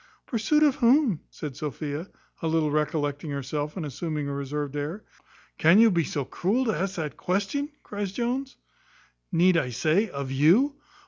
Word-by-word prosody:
"Pursuit 300 Hz, +5 st, +2 dB
of 290 Hz, -3 st, +4 dB
whom?" 245 Hz, -, +4 dB
said 145 Hz, -4 st, -7 dB
Sophia, 150 Hz, +3 st, -4 dB, 0.3 s
a 165 Hz, -, -1 dB
little 160 Hz, -2 st, +1 dB
recollecting 150 Hz, 0 st, -1 dB
herself, 145 Hz, +3 st, -3 dB
and 170 Hz, -, -3 dB
assuming 150 Hz, +1 st, -3 dB
a 140 Hz, -, -3 dB
reserved 140 Hz, +1 st, -3 dB
air. 150 Hz, +8 st, -4 dB, 0.6 s
"Can 165 Hz, +5 st, +6 dB
you 225 Hz, 0 st, +7 dB
be 170 Hz, -3 st, +2 dB
so 140 Hz, -3 st, -3 dB
cruel 220 Hz, -, 0 dB
to 220 Hz, -, +1 dB
ask 195 Hz, +1 st, -2 dB
that 155 Hz, -6 st, -4 dB
question?" 205 Hz, +11 st, -1 dB
cries 205 Hz, -2 st, -4 dB
Jones; 250 Hz, +5 st, -2 dB, 0.7 s
"Need 175 Hz, +1 st, +4 dB
I 135 Hz, -6 st, 0 dB
say, 160 Hz, -, +1 dB
of 140 Hz, -1 st, -5 dB
you?" 180 Hz, -, +4 dB
165 Hz, 165 wpm, -26 LUFS, 145-210 Hz, 0.7 s, you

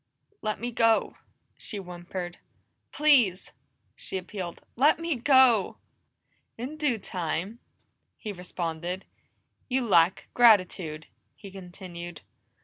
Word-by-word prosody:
"Let 215 Hz, 0 st, -2 dB
me 240 Hz, +1 st, -3 dB
go," 230 Hz, -1 st, +2 dB, 0.4 s
she 210 Hz, -, -6 dB
whimpered. 180 Hz, -1 st, -7 dB, 0.5 s
"Please!" 255 Hz, -12 st, +3 dB, 0.4 s
she -, -, -5 dB
appealed. 185 Hz, -2 st, -6 dB, 0.2 s
"Let 285 Hz, +5 st, +4 dB
me 330 Hz, -1 st, -2 dB
go!" 250 Hz, -4 st, +4 dB, 0.8 s
"In 255 Hz, +6 st, -5 dB
due 295 Hz, -6 st, 0 dB
time," 185 Hz, +2 st, -4 dB, 0.6 s
he 215 Hz, -, -6 dB
responded. 180 Hz, 0 st, -4 dB, 0.6 s
"You 255 Hz, -1 st, +1 dB
lack 170 Hz, -2 st, +3 dB
gratitude," 185 Hz, -9 st, +4 dB, 0.3 s
he 200 Hz, -3 st, -12 dB
continued. 175 Hz, -3 st, -9 dB
195 Hz, 100 wpm, -27 LUFS, 175-240 Hz, 0.8 s, Let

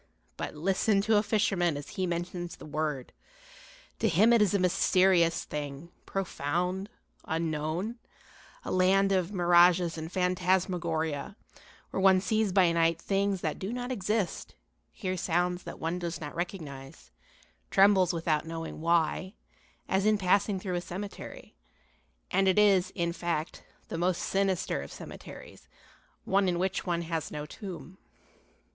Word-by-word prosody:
But -, -, -5 dB
listen 195 Hz, +5 st, +2 dB
to 215 Hz, +1 st, +3 dB
a -, -, +5 dB
fisherman 195 Hz, -7 st, +1 dB
as 145 Hz, -, -8 dB
he 185 Hz, -1 st, -2 dB
mentions 175 Hz, 0 st, -4 dB
the -, -, -12 dB
word. 150 Hz, -3 st, -3 dB, 0.9 s
To 220 Hz, -, +2 dB
him 210 Hz, +7 st, +5 dB
it 230 Hz, -, +5 dB
is 205 Hz, -1 st, +3 dB
a -, -, +5 dB
mysterious 180 Hz, -1 st, +3 dB
thing, 145 Hz, +2 st, -6 dB, 0.2 s
profound, 180 Hz, +2 st, -2 dB, 0.4 s
unknown, 165 Hz, +7 st, -2 dB, 0.7 s
a -, -, -3 dB
land 195 Hz, +2 st, +3 dB
of 185 Hz, -1 st, +1 dB
mirages 175 Hz, -2 st, +4 dB
and 160 Hz, +1 st, -6 dB
phantasmagoria, 180 Hz, -3 st, 0 dB, 0.6 s
where -, -, -2 dB
one 190 Hz, -1 st, +6 dB
sees 215 Hz, +2 st, 0 dB
by 180 Hz, -2 st, +4 dB
night 165 Hz, 0 st, +2 dB
things 195 Hz, -1 st, 0 dB
that 155 Hz, -, -2 dB
do 195 Hz, +3 st, -4 dB
not 245 Hz, +1 st, -4 dB
exist, 210 Hz, -3 st, -2 dB, 0.4 s
hears 185 Hz, -3 st, -3 dB
sounds 175 Hz, +1 st, 0 dB
that -, -, -7 dB
one 165 Hz, +2 st, -2 dB
does 170 Hz, -3 st, -4 dB
not 150 Hz, -1 st, -6 dB
recognize, 145 Hz, -, -7 dB, 0.6 s
trembles 195 Hz, -2 st, +5 dB
without 160 Hz, -3 st, 0 dB
knowing 165 Hz, -1 st, -6 dB
why, 170 Hz, +3 st, +1 dB, 0.5 s
as 190 Hz, +2 st, +1 dB
in 215 Hz, 0 st, +4 dB
passing 200 Hz, +1 st, +2 dB
through 185 Hz, -1 st, -4 dB
a -, -, -2 dB
cemetery 195 Hz, +3 st, -8 dB, 0.8 s
and 195 Hz, -, +3 dB
it 190 Hz, -, +3 dB
is, 200 Hz, -3 st, +5 dB
in 170 Hz, -2 st, -1 dB
fact, 170 Hz, -2 st, -3 dB, 0.3 s
the 165 Hz, -, -4 dB
most 180 Hz, 0 st, 0 dB
sinister 195 Hz, -, 0 dB
of 70 Hz, -, -9 dB
cemeteries, -, -, -11 dB, 0.6 s
one 195 Hz, 0 st, +2 dB
in 175 Hz, -, 0 dB
which 185 Hz, +1 st, -1 dB
one 170 Hz, -1 st, 0 dB
has 165 Hz, -2 st, -3 dB
no 150 Hz, 0 st, -5 dB
tomb. 185 Hz, +2 st, -9 dB
180 Hz, 145 wpm, -29 LUFS, 165-195 Hz, 0.9 s, one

